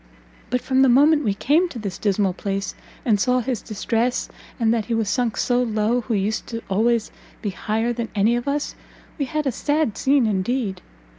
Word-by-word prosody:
But 250 0 0
from 265 0 +2
the 265 - +6
moment 295 +5 +5
we 205 -5 0
came 310 - +2
to 265 - -8
this 200 -4 -5
dismal 200 -2 +1
place, 195 +1 -3 0.3
and 215 -4 +3
saw 250 +4 +2
his 245 -3 -2
distress, 230 +3 -1 0.3
and 225 -1 +3
that 225 -3 0
he 235 - -1
was 225 -2 0
sunk 235 +2 0
so 245 0 +2
low 225 +1 +1
who 230 -1 -2
used 215 +3 -2 0.2
always 225 +3 +2
to - - -28 0.3
be 205 - -1
higher 220 +5 -1
than 235 -1 -4
any 215 +4 +3
of 240 +3 -3
us, 290 +1 -1 0.5
we 280 - +1
had 305 +3 -2
a 270 - +1
sad 290 -2 0
scene 270 -2 +3
indeed! 210 0 -1
235 Hz, 200 wpm, -22 LUFS, 210-255 Hz, 0.5 s, the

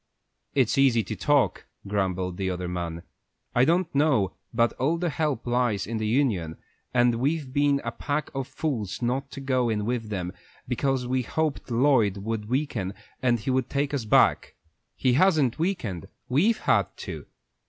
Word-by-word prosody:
"It's 130 -1 +3
easy 125 -5 +4
to 90 - -5
talk," - - +1 0.2
grumbled 95 -3 -1
the 95 -1 -1
other 90 0 -3
man. 85 -1 -4 0.5
"I 125 - +4
don't 170 +2 +1
know 140 -9 +2 0.2
but 115 0 +2
all 150 +7 +2
our 170 - 0
help 150 -6 -1
lies 120 -5 +1
in 110 +1 -3
the 110 - -1
union, 105 - 0 0.3
and 120 -1 +4
we've 140 0 -1
been 145 -1 +3
a 115 - -2
pack 145 +5 -3
of 135 -1 -3
fools 120 - -3
not 130 +3 -1
to - - -8
go 130 -3 +1
in 105 -2 -1
with 115 -2 -2
them, 90 -3 -3 0.3
because 130 +1 0
we 130 +1 0
hoped 155 +4 -2
Lloyd 115 -5 +3
would 105 +1 -4
weaken 120 -8 -1 0.3
and 120 -2 +3 0.3
take 140 +1 -1
us 130 -6 -1
back. 105 - +3 0.4
He 130 - +2
hasn't 150 -4 +3
weakened; 125 - -2 0.2
we've 185 - +3
had - - +3 0.2
to. - - -7
125 Hz, 165 wpm, -26 LUFS, 105-140 Hz, 0.5 s, easy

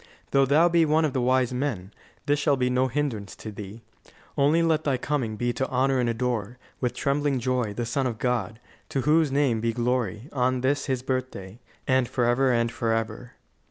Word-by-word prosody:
Though 135 -1 +4
thou 155 +5 +5
be 170 -1 +3
one 155 +1 +3
of 145 - -2
the 130 - 0
wise 130 0 +2
men, 115 -8 -3 0.3
this 145 0 +1
shall 145 -2 +2
be 125 -1 +1
no 130 +1 +2
hindrance 125 -7 -3
to 110 - -8
thee. 105 +2 -9 0.5
Only 150 +4 +3
let 160 -1 +2
thy 140 -3 +1
coming 125 -5 -2
be 120 +2 -1
to 130 +3 -2
honour 130 +1 +1
and 120 -1 +1
adore, 120 -1 -2 0.2
with 125 -2 -1
trembling 140 -1 0
joy, 125 -4 -1
the 120 - -2
Son 130 +3 -1
of 115 -3 -4
God, 115 -3 -2 0.3
to 135 - -1
whose 150 +2 +3
name 135 -5 +1
be 115 0 0
glory, 120 -1 -1
on 130 -1 0
this 140 +2 0
His 130 -2 -1
birthday, 130 -6 -4 0.3
and 130 -2 +2
forever 125 +2 +2
and 115 -1 +1
forever." 115 +1 -2
125 Hz, 195 wpm, -25 LUFS, 115-140 Hz, 0.5 s, thou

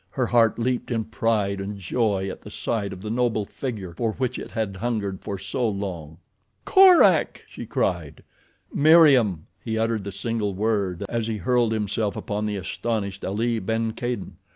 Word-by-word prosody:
Her 125 +6 -1
heart 115 -2 +3
leaped 125 +1 -1
in 115 -3 0
pride 110 -3 0
and 100 +1 -5
joy 100 0 0
at 95 - -6
the - - -10
sight 105 -4 -2
of 95 - -9
the 105 - -4
noble 115 -3 0
figure 105 -8 -6
for 110 +4 -1
which 130 0 -2
it - - -7
had 110 -4 -3
hungered 105 -4 -2
for 100 - -4
so 105 +5 -1
long. 90 -6 -5 0.5
"Korak!" 375 -3 +6
she - - -9
cried. - - -2 0.5
"Meriem!" 140 - +5 0.2
He 110 -1 -2
uttered 110 -2 0
the 100 - -5
single 105 -1 -2
word 100 -3 -1
as 115 0 -2
he 110 -1 -2
hurled 120 +3 +1
himself 105 -1 -1
upon 105 +1 -3
the 105 -1 -2
astonished 100 0 -3
Ali 115 +4 0
ben 115 +3 -1
Kadin. 120 -7 -4
110 Hz, 170 wpm, -24 LUFS, 100-115 Hz, 0.5 s, Korak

